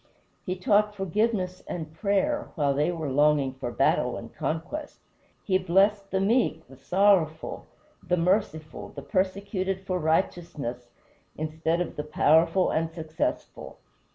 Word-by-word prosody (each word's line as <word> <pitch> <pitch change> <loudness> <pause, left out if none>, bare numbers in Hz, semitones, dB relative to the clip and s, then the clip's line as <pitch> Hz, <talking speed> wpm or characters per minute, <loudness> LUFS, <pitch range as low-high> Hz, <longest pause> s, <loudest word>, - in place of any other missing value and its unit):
He 185 - -1
taught 210 +3 +2
forgiveness 195 -1 -1
and 160 -3 -5
prayer, 205 - 0
while 145 -3 +2
they 150 +5 +1
were 160 -5 -3
longing 145 -1 +3
for 130 -2 -5
battle - - +1
and - - -9
conquest. 175 - -4 0.5
He 185 -2 +2
blessed 195 +3 +2
the 190 - 0
meek, 195 -5 +1
the 135 - -14
sorrowful, 175 0 +1 0.3
the 180 - 0
merciful, 165 -4 -1
the - - -7
persecuted 190 0 -1
for 185 -1 -1
righteousness, 155 -7 -1 0.5
instead 160 +2 -1
of 180 - -4
the 150 - -2
powerful 160 +4 +3
and 160 0 0
successful. 160 -1 -4
175 Hz, 130 wpm, -27 LUFS, 155-195 Hz, 0.5 s, longing